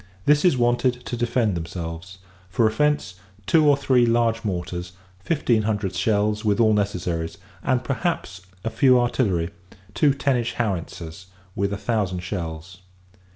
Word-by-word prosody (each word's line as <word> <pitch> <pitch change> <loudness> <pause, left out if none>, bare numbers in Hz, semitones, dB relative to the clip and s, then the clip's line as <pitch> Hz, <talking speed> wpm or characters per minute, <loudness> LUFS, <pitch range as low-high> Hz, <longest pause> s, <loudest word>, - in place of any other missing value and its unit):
This 150 0 +4
is 175 -8 +4
wanted, 120 +1 +1
to - - -3
defend 120 -3 0
themselves: 85 +2 -6 0.3
for 115 +5 +2
offence, 110 -5 0 0.3
two 155 - +4
or 140 - +5
three 130 -3 +3
large 115 -1 +2
mortars; 90 -2 -4 0.3
fifteen 120 - +1
hundred 105 -3 -1
shells, 105 +3 +1
with 105 0 +1
all 110 -2 +5
necessaries; 90 -5 -2 0.2
and, 130 -1 0
perhaps, 135 - -2 0.2
a 115 - -2
few 125 +2 +5
artillery 105 -9 0 0.4
two 140 +7 +3
ten 140 -2 +1
inch 115 -1 -2
howitzers, 90 -4 -4 0.3
with 100 +1 0
a 100 - -2
thousand 100 -6 -1
shells. 90 -1 -6
110 Hz, 145 wpm, -23 LUFS, 90-125 Hz, 0.4 s, or